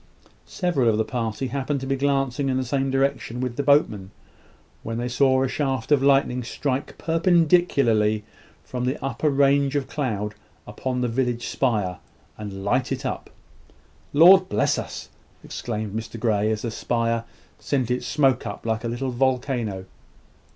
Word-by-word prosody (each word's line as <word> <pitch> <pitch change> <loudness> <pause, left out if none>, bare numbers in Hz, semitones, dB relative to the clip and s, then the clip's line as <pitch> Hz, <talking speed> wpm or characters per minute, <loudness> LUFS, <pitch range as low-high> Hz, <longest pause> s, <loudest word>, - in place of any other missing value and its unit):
Several 170 - +1
of 110 - +2
the 110 - +1
party 120 +1 -3
happened 140 +1 -2
to - - -4
be 135 0 0
glancing 135 -1 0
in 130 - +1
the 130 - -1
same 135 +2 0
direction 135 -3 -1
with 125 -2 -3
the 145 - -1
boatmen, 140 -10 +2 0.7
when 115 0 -4
they 120 +1 -2
saw 130 +1 +3
a - - +1
shaft 135 -2 -2
of 145 -2 +5
lightning 135 -2 +3
strike 130 +3 -3
perpendicularly 160 - +2 0.4
from 125 -1 -3
the 130 +3 -1
upper 135 +3 0
range 140 0 +3
of 140 -2 -1
cloud 105 -7 -2 0.3
upon 125 +4 -3
the 125 - +1
village 120 0 -1
spire, 105 -8 -1 0.4
and 100 -2 -7
light 125 +6 0
it 135 +1 -3
up. 130 - -4 0.8
"Lord 185 +5 +7
bless 105 - +1
us!" - - -7 0.3
exclaimed 110 -3 -5
Mr 115 +1 -5
Grey, 110 -2 +1
as 110 -1 -2
the 115 - -2
spire 115 0 -1 0.4
sent 130 -4 -1
its 125 - -1
smoke 135 -4 +2
up - - -7
like 110 0 -1
a - - -2
little 125 +3 -3
volcano. 125 -6 -1
130 Hz, 160 wpm, -24 LUFS, 115-140 Hz, 0.8 s, Lord